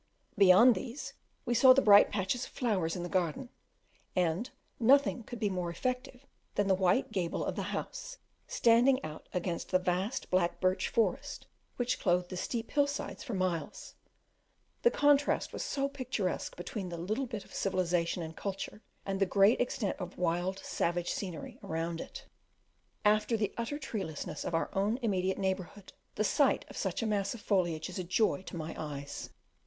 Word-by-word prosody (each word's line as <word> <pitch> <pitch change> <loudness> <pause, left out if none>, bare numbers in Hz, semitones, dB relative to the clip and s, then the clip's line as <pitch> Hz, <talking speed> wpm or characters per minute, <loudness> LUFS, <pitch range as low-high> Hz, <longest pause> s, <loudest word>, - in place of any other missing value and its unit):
Beyond 200 +6 +7
these 270 +4 -6 0.3
we 240 - 0
saw 260 +2 +8
the 270 - +4
bright 205 -1 +8
patches 205 +5 -1
of - - -13
flowers 190 -10 0
in 175 - -4
the - - -3
garden, 185 - -1 0.7
and 180 +6 +1 0.3
nothing 260 +1 +4
could 235 +1 -8
be 210 - +1
more 180 -3 -2
effective 250 +6 -3 0.3
than 205 -1 +1
the 195 - +4
white 190 +8 +2
gable 180 -5 -1
of - - -2
the - - -2
house - - -5 0.3
standing 245 +3 +4
out 155 0 -9
against 175 -1 -3
the 185 - +4
vast 185 +6 -2
black 180 -2 +1
birch 185 0 +1
forest 220 -5 -1 0.3
which 245 0 -1
clothed 180 -1 +1
the 185 - -5
steep 225 +5 -3
hill 285 -1 +3
sides 285 0 -5
for 245 -8 -4
miles 185 -3 -3 0.9
the 475 - +6
contrast 290 -6 +2
was - - -4
so 275 0 -1
picturesque 255 -9 -3
between 180 +2 -5
the 170 - -5
little 215 +10 -2
bit 215 -4 -6
of - - -17
civilization 180 -2 0
and 160 0 -7
culture 200 +1 -5 0.2
and 195 -1 -2
the 195 - +4
great 200 +6 +4
extent 245 -4 -1
of 180 -2 -6
wild, 180 +2 0
savage 175 +1 -1
scenery 180 -6 -5
around 165 +1 -3
it. - - -9 0.8
After 215 +2 +3
the 210 -2 -1
utter 235 +5 -3
treelessness 205 - -5
of 170 - -1
our 165 - -1
own 205 +4 +1
immediate 190 -3 0
neighbourhood, 190 0 -3 0.2
the 215 - +1
sight 270 +5 +2
of - - -11
such 190 +3 -2
a - - 0
mass 200 -1 0
of 225 - -10
foliage 175 -7 0
is 185 0 -6
a - - -2
joy 185 +3 +1
to - - -6
my 160 0 -5
eyes. 145 -2 -6
195 Hz, 175 wpm, -31 LUFS, 180-240 Hz, 0.9 s, saw